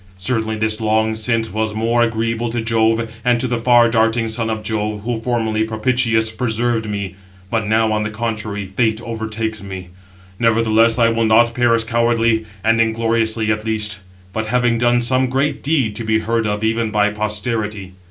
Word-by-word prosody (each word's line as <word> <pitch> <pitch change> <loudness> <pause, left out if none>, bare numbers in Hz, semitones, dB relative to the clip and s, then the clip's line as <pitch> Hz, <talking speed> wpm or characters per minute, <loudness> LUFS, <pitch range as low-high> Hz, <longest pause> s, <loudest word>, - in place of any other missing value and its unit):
Certainly 110 +2 -1
this 110 +1 -1
long 110 0 +1
since 115 0 -1
was 110 0 -2
more 115 +2 +1
agreeable 115 0 0
to 120 +1 -2
Jove 115 0 0
and 120 -1 +2
to 130 - -1
the 120 -1 -1
far 120 0 +5
darting 115 0 +1
son 115 0 -2
of 110 -1 -3
Jove, 105 -1 -2
who 115 -1 -3
formerly, 115 -2 -1
propitious, 110 0 +1
preserved 115 -1 -1
me; 100 -3 -4 0.4
but 110 -2 0
now, 110 0 +2
on 105 0 0
the 105 - -2
contrary, 110 -2 -4
Fate 110 +3 0
overtakes 110 -1 -4
me. 95 -2 -8 0.5
Nevertheless 115 0 +3
I 115 -1 +4
will 115 0 +1
not 115 +2 +4
perish 115 -1 +2
cowardly 115 -1 +1 0.2
and 115 +1 +3
ingloriously 115 -1 0
at 105 0 -2
least, 105 -2 -1 0.3
but 110 0 -2
having 120 0 +1
done 120 0 +2
some 130 +2 +2
great 135 +3 -1
deed 135 -8 0
to 115 - -4
be 110 0 +1
heard 115 0 -1
of 105 +1 -2
even 115 0 0
by 105 -1 +2
posterity." 105 -2 -3
110 Hz, 175 wpm, -18 LUFS, 110-115 Hz, 0.5 s, far